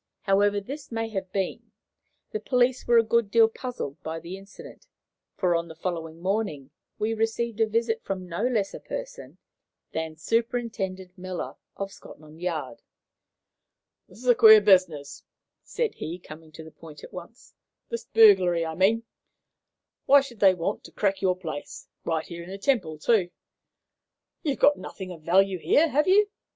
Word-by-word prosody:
However 205 +1 +2
this 270 +8 -8
may 225 0 -2
have 190 -3 -5
been, 195 -2 -3 0.6
the 435 - -2
police 250 -4 +1
were 240 0 +5
a 230 - +6
good 230 -1 +1
deal 225 +1 +6
puzzled 225 - -6
by 160 +1 -5
the 170 +3 -8
incident, 195 +1 -13 0.5
for, 180 -2 +2
on 170 0 -1
the 160 - -11
following 165 -1 -5
morning, 180 -8 -2 0.3
we 215 +1 -1
received 225 0 -1
a 220 - +4
visit 225 +1 0
from 185 -2 -4
no 170 +2 -4
less 215 -6 -1
a - - -7
person - - -8 0.5
than 160 0 -4
Superintendent 200 -2 -2
Miller, 180 -8 -5 0.2
of 195 0 -5
Scotland 155 +2 -14
Yard. 155 -9 -4 1.3
"This - - -16
is 250 +3 -9
a 245 - +8
queer 220 -1 +9
business," 180 -8 +2 0.4
said 475 -3 -2
he, 165 +3 -6
coming 160 -2 -13
to 160 - -10
the 160 - -12
point 155 -2 -13
at - - -11
once 180 +7 -11 0.4
"this 470 0 -5
burglary, 180 - +5
I 160 - -4
mean. 200 +7 +2 1.0
Why 280 +1 +7
should 250 -5 -10
they 190 -2 +6
want 180 +4 -3
to - - -12
crack 195 -2 0
your 185 -2 +2
place, 155 -5 -7 0.2
right 160 -1 -1
here 170 -1 -8
in 175 - -11
the 195 - -6
Temple, 195 - 0
too? 190 +2 +2 1.1
You've 290 -5 -1
got 290 - +4
nothing 190 -2 -8
of 165 -3 -10
value 185 +3 +3
here, 315 - +3
have 300 +3 +1
you? 410 +2 +4
195 Hz, 165 wpm, -26 LUFS, 170-230 Hz, 1.3 s, queer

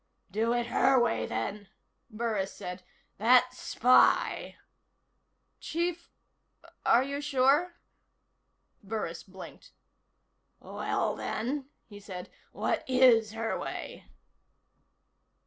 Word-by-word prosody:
"Do 225 +4 0
it 240 0 0
her 260 +2 +3
way, 240 -1 0
then," 205 0 -4 0.4
Burris 215 -4 -2
said. 180 +1 -7 0.4
"That 250 +3 +5
spy 255 0 +3 0.5
" - - -48
"Chief, 340 +1 -2 0.7
are 245 - +4
you 280 +1 -4
sure?" 290 +5 +2 1.1
Burris 200 -5 -4
blinked. 190 -1 -13 0.9
"Well, - - -2
then," 265 +5 -3 0.2
he 205 -2 -12
said, 185 -3 -9 0.2
"what - - -1
is 240 -4 +5
her 225 0 -2
way?" - - -6
235 Hz, 95 wpm, -29 LUFS, 210-265 Hz, 1.1 s, That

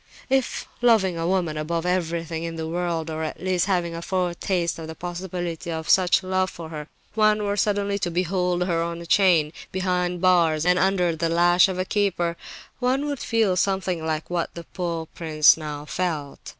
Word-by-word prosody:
If, 265 -2 0
loving 220 -7 +4
a 165 0 -2
woman 175 -4 0
above 165 +2 -2
everything 170 -2 -1
in 165 0 -4
the 160 -1 -4
world, 165 -1 -2
or 155 0 -4
at 155 - -4
least 185 0 0
having 175 -3 0
a 165 - -5
foretaste 175 -1 -1
of 160 - -7
the 160 - -7
possibility 175 -1 -5
of 160 -1 -4
such 185 0 +4
love 185 0 0
for 165 -2 -9
her, 150 -2 -7 0.3
one 215 -1 +3
were 205 0 0
suddenly 200 -1 0
to 175 - -1
behold 180 0 0
her 170 -2 0
on 170 0 -3
a 170 - -8
chain, 170 -5 +3 0.2
behind 180 -1 -1
bars 170 -4 +3
and 180 0 +4
under 180 -3 +2
the 165 +1 -1
lash 175 +2 +5
of 190 -1 -4
a 185 - -1
keeper, 185 -5 0 0.4
one 260 +3 +1
would 285 -3 -3
feel 225 -5 +1
something 185 -3 0
like 160 -1 -2
what 175 -2 -3
the 170 - -7
poor 170 -2 -4
prince 155 -2 +4
now 150 -2 -6
felt. 155 -4 -3
175 Hz, 190 wpm, -24 LUFS, 165-185 Hz, 0.4 s, lash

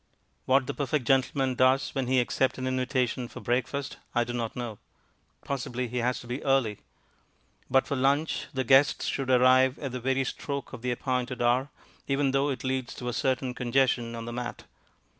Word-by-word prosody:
What 130 0 +3
the - - -3
perfect 140 -1 -1
gentleman 135 +1 +2
does 130 +2 +3
when 135 -3 -1
he 130 0 +3
accepts 130 +2 +1
an 130 - -3
invitation 130 -1 0
to - - -10
breakfast 130 +3 -2 0.2
I 120 - +4
do 120 +1 -5
not 115 -2 -3
know. 120 -4 -5 0.7
Possibly 125 -2 -3
he 125 - -4
has 125 +1 0
to - - -12
be 125 +3 -4
early. 135 -7 +1 0.9
But 135 +1 +4
for 140 - -2
lunch 140 +4 +1
the 130 -3 -1
guests 135 +3 +4
should 135 -2 -2
arrive 130 +1 +5
at 135 -3 -5
the 125 - -4
very 135 +2 +1
stroke 140 +2 -5
of - - -7
the 125 - -2
appointed 125 0 -2
hour, 125 +3 +2 0.4
even 140 0 +1
though 135 +2 +2
it 135 - -3
leads 130 -1 -2
to 125 - -4
a - - -3
certain 130 0 0
congestion 125 -1 +1
on 115 0 -6
the 120 - -5
mat. 120 0 -5
130 Hz, 190 wpm, -28 LUFS, 125-135 Hz, 0.9 s, arrive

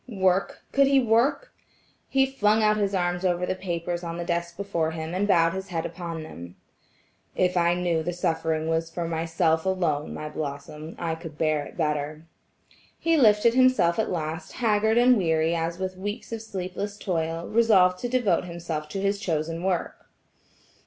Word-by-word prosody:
Work! 190 -3 0
Could 275 0 +4
he 275 0 +5
work? 245 - +1 0.6
He 270 0 +3
flung 220 -5 +2
out 215 0 +4
his 200 -2 0
arms 175 0 0
over 180 -1 +1
the 185 - -1
papers 175 -1 -3
on 170 0 -4
the 175 - -4
desk 170 0 -2
before 180 -5 -1
him, 160 +1 -5
and 195 +3 0
bowed 165 -4 +4
his 190 0 -5
head 165 -3 -3
upon 170 -3 -5
them. 85 - -10 0.8
"If 180 0 +1
I 170 0 +3
knew 175 -2 0
that 160 - -2
the 175 - -1
suffering 160 -2 -1
was 165 0 0
for 170 0 -4
myself 160 0 0
alone, 170 -6 0
my 155 - -5
Blossom, 150 +1 -6
I 170 -2 -2
could 160 -2 -9
bear 155 -2 +1
it - - -14
better." 150 -1 -2 0.7
He 330 0 +2
lifted 230 -4 +5
himself 255 -9 +4
at 220 - 0
last 160 -1 -4
haggard 220 -1 +2
and 245 0 +6
weary 160 -2 +1
as 165 0 -2
with 185 0 -4
weeks 205 +5 -5
of 225 -1 -4
sleepless 200 -1 -5
toil, 165 -3 -2
resolved 195 -6 +4
to 245 - -3
devote 235 -10 +1
himself 170 -3 -5
to 195 +5 -4
his 200 +1 0
chosen 165 -2 -2
work. 185 -2 -2
175 Hz, 180 wpm, -26 LUFS, 165-205 Hz, 0.8 s, and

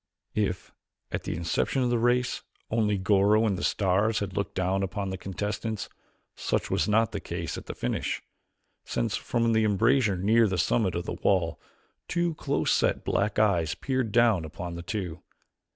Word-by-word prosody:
If, 100 -4 -2 0.4
at - - -3
the - - -2
inception 85 +10 0
of 120 - +1
the 120 - +2
race, 125 +1 +1 0.3
only 105 -2 +2
Goro 100 +3 +4
and 100 -3 +1
the 90 - -5
stars 100 +3 +2
had 100 -2 -3
looked 100 -3 -2
down 95 +1 +1
upon 95 0 -2
the - - -2
contestants, 105 +3 -4 0.5
such - - -1
was - - +1
not 110 +1 +3
the 100 - -3
case 85 -3 -4
at - - -9
its - - -6
finish, 60 - -1 0.6
since 115 -4 -1
from 115 -1 -1
an 115 -1 +3
embrasure 110 0 +3
near 110 +5 +4
the 95 -2 -1
summit 95 +2 +1
of 85 - -2
the - - -3
wall 85 -4 +1 0.5
two 175 -1 0
close 145 -2 0
set - - +1
black 105 0 0
eyes 90 -8 +2
peered 130 -5 -1
down 115 -6 +4
upon 85 +2 -6
the 85 - -6
two. 90 -4 -4
105 Hz, 175 wpm, -27 LUFS, 95-115 Hz, 0.6 s, Goro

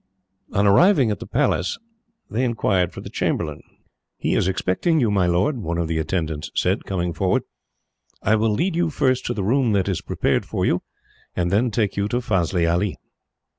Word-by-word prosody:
On 100 +1 +2
arriving 135 - +5
at 105 - -3
the - - -8
Palace, 90 - 0 0.5
they 120 +4 -1
inquired 100 -7 +1
for - - -9
the - - -8
chamberlain. 75 -3 -2 0.6
"He - - -1
is - - +2
expecting 95 - +1
you, 115 -6 +2
my 95 -3 +2
lord," 95 - +1
one 85 -4 -3
of 85 -1 -1
the 80 0 -1
attendants 80 -2 -2
said, - - 0
coming 90 -3 -2
forward. 80 - +1 0.8
"I 110 - +3
will 110 +1 +2
lead 165 - 0
you 170 -1 +1
first 130 -4 0
to 120 - -2
the 100 - -2
room 120 +2 +2
that 100 -2 +1
is 95 -4 -1
prepared - - 0
for - - -2
you, - - +1 0.5
and 85 -1 0
then 115 +5 +2
take 105 -2 -1
you 100 0 +1
to 120 - -1
Fazli 90 -6 0
Ali." 85 +4 0
100 Hz, 190 wpm, -22 LUFS, 90-120 Hz, 0.8 s, arriving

